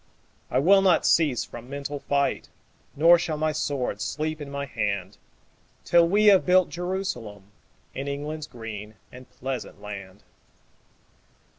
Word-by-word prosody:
I - - 0
will 195 +8 +5
not 185 -4 +3
cease 135 -8 +3
from 120 +1 -11
mental 140 +1 -5
fight, 140 0 -1 0.5
Nor 170 +4 +6
shall 160 -2 -2
my 155 +1 0
sword 140 -8 -2
sleep 155 +8 -3
in 145 - -6
my 140 0 -4
hand 100 -7 -3 0.7
Till 170 -1 +5
we 205 +4 +3
have 200 -3 +7
built 185 0 +4
Jerusalem 150 - -5 0.4
In 135 +1 -5
England's 150 +2 -4
green 110 -3 -8 0.2
and 125 0 -13
pleasant 130 -5 -6
land. 100 -1 -9
140 Hz, 135 wpm, -25 LUFS, 115-165 Hz, 0.7 s, have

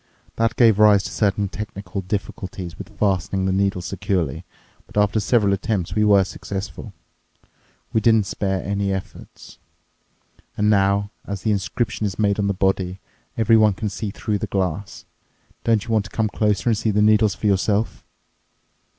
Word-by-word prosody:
That 115 0 +1
gave 115 -4 +5
rise 105 -2 +6
to - - -5
certain 100 -1 +1
technical 100 -1 -6
difficulties 95 -3 -5
with - - -11
fastening 95 -1 0
the 95 - +1
needles 95 -2 0
securely, 90 -6 -2 0.4
but - - -10
after 105 +1 +3
several 105 -1 +2
attempts 95 -3 -2
we 105 +2 +2
were 100 -2 +5
successful. 100 +1 -6 1.0
We 110 - +2
didn't 110 -1 +4
spare 95 -1 -2
any 100 0 -1
efforts. 95 -1 -8 1.0
And 105 +1 +3
now, 100 0 +2 0.2
as 100 -2 -5
the 110 - +1
inscription 105 +2 -1
is 100 - -6
made 105 -1 +1
on 100 - +1
the 100 - +1
body, 95 -1 0 0.4
everyone 110 -2 +4
can 105 +2 -3
see 105 +1 -4
through 105 +1 -3
the - - -3
glass. 95 0 -3 0.6
Don't 115 -3 +2
you 115 - -5
want 110 -2 +2
to - - -9
come 110 -1 -1
closer 105 +2 0
and 115 - +3
see 110 - 0
the 105 0 +2
needles 105 -1 +4
for - - -7
yourself." 100 - +1
100 Hz, 165 wpm, -22 LUFS, 95-105 Hz, 1.0 s, rise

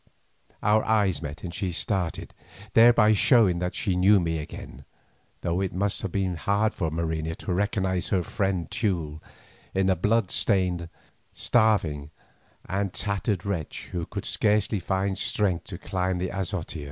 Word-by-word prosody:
Our 105 +1 +4
eyes 105 -6 +2
met 75 +2 -7
and 85 -2 -5
she 95 -1 -2
started, 90 -1 -2 0.4
thereby 115 -2 +6
showing 105 -5 +4
that 90 0 -2
she 95 - 0
knew 95 +3 +5
me 80 -2 -1
again, 75 - -9 0.6
though 85 +2 -1
it 95 -3 -2
must 100 +1 0
have 100 - -4
been 95 -3 -1
hard 100 +5 +1
for 80 -4 -1
Marina 80 0 -2
to 90 - -4
recognise 95 -1 0
her 95 -2 +1
friend 95 -3 -1
Teule 80 -8 -1 0.5
in 95 0 +2
the 95 0 +3
blood 105 +3 +1
stained, 90 -5 +1 0.4
starving, 95 -11 +2 0.6
and 100 +1 -1
tattered 100 -1 -2
wretch 95 -6 -4
who 85 -2 -3
could - - -5
scarcely 105 0 +1
find 95 +2 -1
strength 95 -5 0
to - - -7
climb 95 -1 -2
the 90 +1 -2
azotea. 95 -4 -3
95 Hz, 150 wpm, -26 LUFS, 85-100 Hz, 0.6 s, thereby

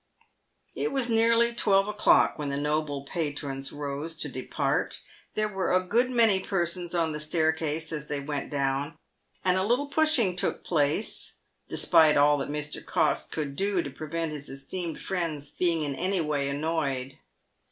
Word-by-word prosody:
It - - -2
was 260 -3 0
nearly 230 +1 +4
twelve 195 -3 +3
o'clock 210 - +3
when 145 -1 -2
the 140 - -2
noble 150 -1 -1
patrons 145 -4 -3
rose 145 +3 -4
to 165 - -4
depart. - - -2 0.3
There 215 0 +1
were 190 -3 -2
a - - +6
good 240 +6 +3
many 225 -6 +4
persons 175 -2 -2
on 165 -2 +1
the 150 - -4
staircase 160 0 0
as 150 -1 -5
they 145 -1 -2
went 140 0 -4
down, 140 +2 -1 0.5
and 185 0 +3
a 190 - +2
little 245 +7 +1
pushing 285 - +2
took 180 - -1
place, 155 +4 0 0.3
despite 160 -4 +5
all 145 0 +5
that - - -3
Mr. 150 0 -4
Cox - - +1
could 145 -3 -4
do 195 0 +1
to 140 - -6
prevent 155 +3 -4
his 150 -1 -6
esteemed 160 +5 -5
friends 155 -6 -3
being 170 -2 +1
in 145 -2 -2
any 185 +7 0
way 150 -3 0
annoyed. 140 -3 -2
160 Hz, 165 wpm, -27 LUFS, 145-190 Hz, 0.5 s, a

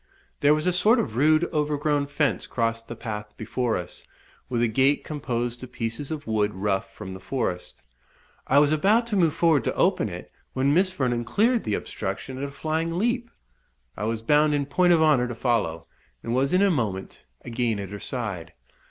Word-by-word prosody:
There 145 +1 +5
was 155 - -1
a 180 - +2
sort 210 +7 +4
of 125 - -2
rude 155 +5 +4
overgrown 150 -1 0
fence 145 - 0
crossed 115 -1 -1
the 120 - -6
path 105 -2 -6
before 120 +1 -1
us, 90 0 -8 0.5
with 120 -2 0
a - - +4
gate 135 +5 +2
composed 120 -5 -3
of 125 - -9
pieces 115 +4 -4
of 155 -2 -5
wood 105 -2 0
rough 95 0 -1
from 95 -1 -8
the 95 - -8
forest; 90 -4 -3 0.6
I 135 - +3
was 145 0 +5
about 205 +10 +3
to 230 -3 -2
move 170 -6 +3
forward 160 -7 +3
to - - -1
open - - +2
it, - - -9 0.2
when 135 +2 +2
Miss 185 +3 +3
Vernon 125 -8 -1
cleared 230 - +1
the 105 - 0
obstruction 130 -1 -5
at - - -4
a - - -5
flying 160 +3 -2
leap. 235 +4 0 0.7
I 105 - -3
was 115 0 -2
bound 150 +4 +4
in 140 -1 0
point 175 +5 +3
of 165 -2 +5
honour 140 -6 +4
to 120 - -5
follow, 105 -10 0 0.4
and 115 - -2
was 135 +2 +1
in 185 +2 +4
a 200 - +4
moment 100 - -3 0.2
again 120 -2 -1
at 100 -2 -5
her 105 - -6
side. 105 -11 -4
130 Hz, 195 wpm, -25 LUFS, 115-155 Hz, 0.7 s, There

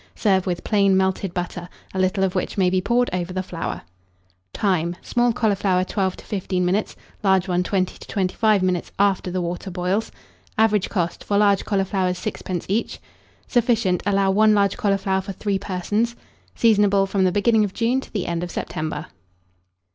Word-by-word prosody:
Serve 190 -4 +2
with 175 -1 -2
plain 200 -3 +3
melted 190 0 0
butter, 175 0 -5 0.2
a 190 - -2
little 185 +1 +1
of 190 -1 +1
which 185 - -2
may 185 -2 +3
be 185 0 +2
poured 245 +5 +2
over 180 0 -2
the 185 0 -2
flower. 175 -3 -5 0.7
Time. 175 -4 0
Small 240 0 +2
cauliflower, 200 -5 +1
12 190 -1 -1
to - - -13
15 185 -2 -1
minutes, 195 +4 0 0.3
large 190 -1 +3
one, 180 -1 +1
20 185 0 -1
to - - -12
25 200 +1 +1
minutes, 180 -2 -1
after 195 -2 +2
the 180 0 -2
water 175 +3 -4
boils. 185 +4 -1 0.5
Average 215 -3 +3
cost, 175 -4 -2
for 200 - 0
large 200 -1 +3
cauliflowers, 190 -2 0
6d. 185 -3 -4
each. 210 +5 -1 0.5
Sufficient. 230 -7 +2
Allow 195 -1 +3
1 215 +2 +4
large 200 -1 +2
cauliflower 195 -1 0
for 195 +1 -6
3 200 +1 -1
persons. 205 +5 -1 0.4
Seasonable 205 -3 +4
from 195 0 +1
the 185 - +3
beginning 215 +3 +3
of 200 -2 -3
June 240 +3 +1
to - - -13
the 200 -5 -2
end 170 -1 -2
of 175 - -4
September. 155 -2 -4
195 Hz, 175 wpm, -22 LUFS, 185-210 Hz, 0.7 s, 1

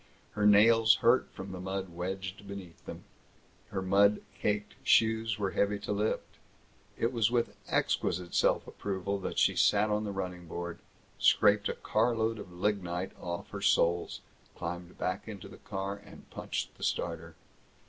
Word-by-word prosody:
Her 105 -1 +2
nails 110 +2 +6
hurt 120 +2 +5
from 95 0 -8
the 95 - -6
mud 95 0 -3
wedged 95 +3 -5
beneath 95 -4 -9
them. - - -7 0.6
Her 100 -2 -3
mud 100 +2 +4
caked 105 0 -1
shoes 110 -1 +3
were 100 -2 -1
heavy 100 +3 +1
to 100 +1 -5
lift. 105 +1 -2 0.6
It 115 +3 0
was 115 -2 +3
with 120 -1 0
exquisite 90 -1 0
self - - +3
approval 100 0 -3
that - - -5
she - - +4
sat 105 +1 +3
on 105 0 +1
the 105 - -3
running 90 -3 -5
board, 85 +1 -5 0.4
scraped - - +4
a - - -2
car 120 0 +1
load 110 0 0
of 95 -3 -9
lignite 90 -1 -1
off 85 0 -5
her - - -6
soles, 85 +1 +2 0.3
climbed 90 +1 -6
back 90 +4 -2
into 105 -4 -8
the - - -12
car, 100 +1 -4 0.3
punched - - -4
the - - -8
starter. 85 -1 -2
100 Hz, 160 wpm, -31 LUFS, 90-105 Hz, 0.6 s, nails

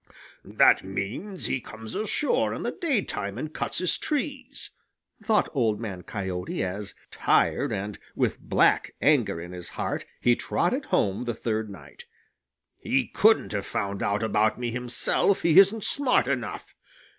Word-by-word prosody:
"That - - +4
means 110 - -4
that - - +2
he 130 - -1
comes 110 -1 -9
ashore 220 +7 0
in - - -5
the - - -1
daytime 205 - -2
and 155 +4 -5
cuts - - -3
his 180 -1 +1
trees," 280 -3 -4 0.5
thought 215 -1 +2
Old 115 -7 +1
Man 100 -6 -5
Coyote 95 -2 -4
as, 100 +2 -5 0.2
tired - - +2
and 100 +2 -4 0.2
with - - 0
black - - +2
anger 125 - +2
in 85 +1 -8
his 90 -1 -7
heart, - - -2
he 120 0 +4
trotted 255 - -1
home 100 +4 0
the 120 -2 -2
third 110 -2 -2
night. 75 -7 -12 0.7
"He 130 -1 0
couldn't 220 +1 +3
have 100 -2 -3
found 100 0 -3
out 100 +2 0
about 110 0 +2
me 120 -1 -3
himself; 125 +10 0
he 170 +2 +7
isn't 200 +2 +5
smart 275 -3 +2
enough. - - -3
115 Hz, 155 wpm, -26 LUFS, -, 0.7 s, he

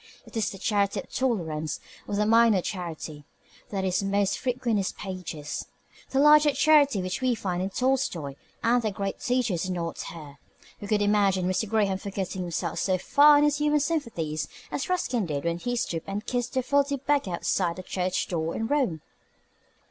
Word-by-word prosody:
It - - -15
is 220 -2 +1
the 195 - -8
charity 200 0 +1
of - - -10
tolerance, 160 - -1 0.3
or 205 - -2
the 210 +1 +2
minor 225 -4 +5
charity, 160 -5 -5 0.5
that 195 -2 -2
is 185 0 +1
most 200 0 0
frequent 250 -1 -1
in 215 - +3
his 195 -2 -1
pages. 180 -6 -6 0.4
The 270 - -2
larger 300 0 +6
charity 285 -11 +4
which 185 +7 -3
we 255 -2 +2
find 180 -4 -2
in 190 - -1
Tolstoi 245 - 0 0.3
and 240 +2 +3
the 220 - 0
great 195 0 -4
teachers 245 - 0
is - - -4
not 170 -2 -3
here. 150 -4 -9 0.4
We 205 - -7
could 210 0 +1
not - - +3
imagine 200 -3 +2
Mr. 185 +3 0
Graham 200 -3 +1
forgetting 195 -1 -4
himself 175 -2 -3
so 185 -1 +1
far 290 +9 +6
in 290 - +4
his 295 -1 +2
human 300 0 +3
sympathies 220 - -2 0.2
as 280 - -3
Ruskin 255 - 0
did 145 -3 -3
when 170 0 -1
he 245 +5 -2
stooped 165 -8 -2
and 205 +2 -4
kissed 245 +1 -2
the 260 - +1
filthy 280 +1 +2
beggar 275 -8 0
outside 170 0 0
the 185 - -8
church 180 0 -1
door 165 -2 -2
in 225 - -2
Rome. 240 - 0
200 Hz, 190 wpm, -27 LUFS, 180-255 Hz, 0.5 s, larger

